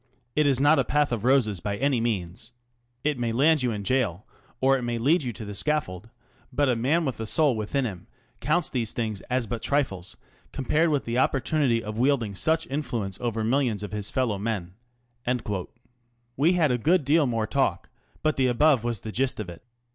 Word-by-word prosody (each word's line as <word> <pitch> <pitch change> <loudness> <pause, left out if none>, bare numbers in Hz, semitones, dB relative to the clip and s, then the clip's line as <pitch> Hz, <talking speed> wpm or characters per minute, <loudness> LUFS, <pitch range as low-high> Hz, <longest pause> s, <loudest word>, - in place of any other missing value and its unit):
" 120 -1 -45
It 150 -1 +3
is 135 -3 +2
not 145 +2 +5
a - - +3
path 150 0 +1
of 115 -4 -2
roses 120 -7 +3
by 100 +4 -3
any 135 -1 +1
means. 110 0 -3 0.5
It 150 -4 0
may 120 -1 0
land 150 +6 +3
you 125 - +1
in 105 -3 -3
gaol, 115 -4 0 0.3
or 135 +1 +4
it 130 - -2
may 120 -1 -2
lead 145 +10 +3
you 125 -4 -3
to 110 - -8
the 105 - -6
scaffold; 115 - -2 0.4
but 145 -1 +1
a 125 - +2
man 145 +9 +1
with 130 -5 -3
a 110 - -4
soul 145 +3 +3
within 110 +5 -1
him 95 -6 -6 0.3
counts 155 +3 +1
these 115 -4 -2
things 110 -4 -3
as 125 -1 +1
but 110 +1 -4
trifles 115 -11 -1 0.3
compared 150 +5 +1
with 145 -3 0
the 115 +2 0
opportunity 130 -3 +1
of 110 +1 -5
wielding 125 -5 +1
such 160 - +1
influence 120 -9 -3
over 115 -2 -1
millions 115 -3 +1
of 105 - -6
his 105 -1 -2
fellow 115 -6 0
men." 100 -5 -3 1.6
We 160 +7 +3
had 160 -6 +3
a 125 - 0
good 165 +5 +2
deal 150 +1 +3
more 115 -3 0
talk, - - 0 0.4
but 155 -1 +1
the 130 -1 +3
above 130 0 +3
was 120 -4 -2
the 110 - -6
gist 130 +2 -1
of 105 -4 -4
it. 85 - -11
125 Hz, 205 wpm, -26 LUFS, 110-140 Hz, 1.6 s, not